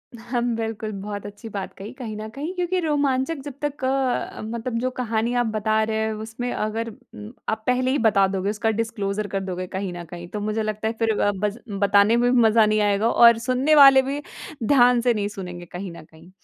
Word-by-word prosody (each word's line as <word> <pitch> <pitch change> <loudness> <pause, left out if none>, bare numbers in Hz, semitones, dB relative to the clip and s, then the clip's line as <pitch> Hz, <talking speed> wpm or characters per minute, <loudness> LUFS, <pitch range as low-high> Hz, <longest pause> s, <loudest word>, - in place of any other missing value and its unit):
हाँ। 240 +1 -3
बिल्कुल 225 -1 -4
बहुत 205 0 -6
अच्छी 205 +2 -9
बात 200 -2 -5
कही, 200 +3 -8
कहीं 235 -5 -7
न 215 +1 -6
कहीं 305 +6 -4
क्योंकि 360 0 0
रोमांचक 290 -2 0
जब 285 - -6
तक 290 -2 -4
अ, 265 -1 -1
मतलब 230 +2 -4
जो 255 +2 0
कहानी 230 0 0
आप 245 0 +2
बता 220 0 0
रहे 220 0 -1
हैं, 220 0 0
उसमें 225 +3 -5
अगर 220 +2 -2
उम, 105 - -12 0.2
आप 220 0 -2
पहले 255 +1 +2
ही 280 - +2
बता 205 -4 +4
दोगे 190 +1 -2
उसका 215 +1 -1
डिस्क्लोज़र 215 -2 -2
कर 195 +1 -2
दोगे 185 -1 -4
कहीं 190 +1 -4
न 175 0 -7
कहीं, 175 +1 -9
तो 210 - -5
मुझे 215 +1 -1
लगता 215 0 -2
है 225 - -1
फिर 225 -1 +2
अ, 205 - +3
बज़ 210 +2 -1 0.2
बताने 200 +3 +4
में 245 +1 +3
भी 250 - +4
मज़ा 220 -1 +5
नहीं 215 0 +2
आएगा 205 +2 +2
और 235 -1 +7
सुनने 260 +5 +3
वाले 275 -2 +9
भी, 275 +2 -3 0.4
ध्यान 245 -1 +5
से 240 0 +3
नहीं 205 -2 -1
सुनेंगे 180 -3 -7
कहीं 180 +2 -7
न 170 - -11
कहीं। 160 +2 -18
220 Hz, 220 wpm, -23 LUFS, 205-245 Hz, 0.4 s, वाले